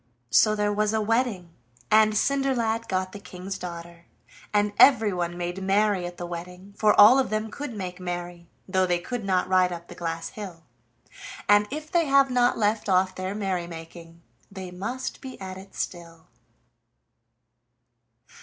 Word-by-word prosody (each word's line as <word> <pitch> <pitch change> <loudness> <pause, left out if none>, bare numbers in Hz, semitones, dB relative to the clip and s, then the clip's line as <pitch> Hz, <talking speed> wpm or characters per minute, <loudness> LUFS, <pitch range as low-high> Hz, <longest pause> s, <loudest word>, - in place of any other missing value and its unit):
So 215 - +5
there 210 0 0
was 215 +1 +1
a - - +2
wedding, 215 -5 0 0.4
and 215 0 +5
Cinderlad 235 -2 0
got 185 0 -1
the 205 - -9
King's 190 0 -7
daughter, 170 -1 -9 0.4
and 205 0 +1
everyone 190 -9 +4
made 175 +2 -4
merry 195 -1 +1
at 175 - -10
the 175 - -5
wedding, 180 +3 -8
for 210 0 +3
all 225 +6 +9
of 265 - 0
them 215 0 -2
could 290 -2 -6
make 185 -2 -6
merry, 175 -1 -6 0.2
though 185 -1 +1
they 175 -1 +2
could 230 +6 -5
not 185 -2 +1
ride 185 -1 +3
up 170 0 -8
the - - -8
glass 165 -1 -4
hill, 185 -6 -9 0.8
and 205 0 +5
if 305 +2 -6
they 335 -3 +2
have 275 -1 +4
not 245 -1 +3
left 210 -1 0
off 185 0 +3
their 185 +1 -4
merry 190 -4 -2
making 165 0 -11 0.3
they 190 -2 -8
must 240 +9 -5
be 260 -1 -9
at 190 -1 -7
it 195 +1 -14
still. 165 -2 -6
190 Hz, 165 wpm, -25 LUFS, 175-215 Hz, 0.8 s, all